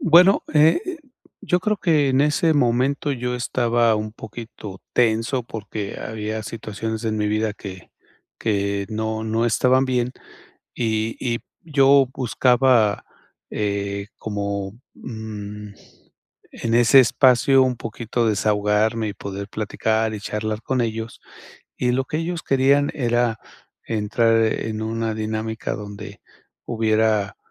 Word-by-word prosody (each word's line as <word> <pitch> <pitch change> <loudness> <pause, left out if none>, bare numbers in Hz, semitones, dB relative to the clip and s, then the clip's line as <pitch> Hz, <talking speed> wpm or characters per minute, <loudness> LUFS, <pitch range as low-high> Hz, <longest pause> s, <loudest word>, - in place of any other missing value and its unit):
Bueno, 180 +4 +6
e 155 - +5
eh, 365 -2 -4 0.4
yo 180 0 +1
creo 210 +2 0
que 155 -7 +2
en 130 +1 +3
ese 150 +2 +3
momento 135 +2 +1
yo 125 -1 -3
estaba 120 -2 +1
un 105 0 -3
poquito 110 -3 -9
tenso 120 +2 +1
porque 105 -2 -6
había 110 0 -4
situaciones 110 0 -5
en 110 -1 -1
mi 105 -1 0
vida 110 0 0
que 95 -3 -10 0.5
que 100 -2 -1
no 110 0 -3
no 115 +2 0
estaban 130 +3 +3
bien, 125 -1 0 0.6
y 110 -1 -1
y 120 -2 -1 0.2
yo 140 -3 +4
buscaba, 125 -4 +3 0.5
eh, 100 -1 -2
como 100 -2 -3 0.2
mm, 105 -2 -7 0.8
en 115 0 -2
ese 120 +3 +7
espacio 130 +2 +4
un 130 -2 +1
poquito 115 +1 -2
desahogarme 105 +1 +1
y - - -3
poder 100 0 -6
platicar 110 +1 -1
y 105 - -6
charlar 105 +1 -3
con 130 -2 -1
ellos, 115 0 -3 0.6
y 125 - +1
lo 130 +1 +1
que 155 - -3
ellos 170 +1 -3
querían 140 +2 +3
era 120 -3 +1 0.5
entrar 115 +1 +1
en 110 0 -2
una 115 0 -2
dinámica 110 0 -3
donde 100 -1 -8 0.4
hubiera, 110 -3 +1
110 Hz, 125 wpm, -22 LUFS, 105-125 Hz, 0.8 s, ese